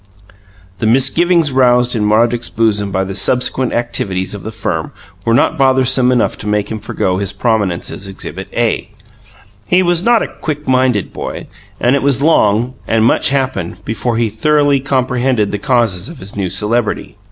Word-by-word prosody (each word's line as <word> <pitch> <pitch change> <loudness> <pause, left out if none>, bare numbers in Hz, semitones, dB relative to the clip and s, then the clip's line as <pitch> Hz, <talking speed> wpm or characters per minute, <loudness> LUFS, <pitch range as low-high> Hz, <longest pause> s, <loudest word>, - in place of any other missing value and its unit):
The 110 - 0
misgivings 150 +6 +3
roused 125 -1 +3
in 105 -2 0
Roderick's 115 +2 +2
bosom 105 -3 0
by 95 0 0
the 95 0 -5
subsequent 125 +5 +1
activities 100 -6 -2
of 100 - -7
the 110 - -6
firm 90 -7 -4 0.3
were 115 - +2
not - - +1
bothersome 130 -1 +3
enough 125 -2 0
to 105 - -7
make 105 0 -1
him 110 - -4
forego 95 -3 -2
his 100 0 0
prominence 105 -7 -1
as 100 - -6
Exhibit 95 0 -7
A. 115 -2 0 0.8
He 185 +1 +3
was 175 -1 +2
not 235 +2 +3
a - - -3
"quick 150 -2 -4
minded" 130 -5 +1
boy, - - -6 0.3
and 125 +3 +2
it 140 - 0
was 135 -2 +2
long 120 -5 +2
(and 110 0 +2
much - - +3
happened) 115 -9 -3
before 115 +1 -2
he 115 -1 +1
thoroughly 145 +5 +2
comprehended 130 -4 0
the 105 - -3
causes 115 - 0
of 170 - -10
his 100 -4 -7
new 100 -3 -2
celebrity. 105 0 -1
120 Hz, 175 wpm, -15 LUFS, 105-130 Hz, 0.8 s, misgivings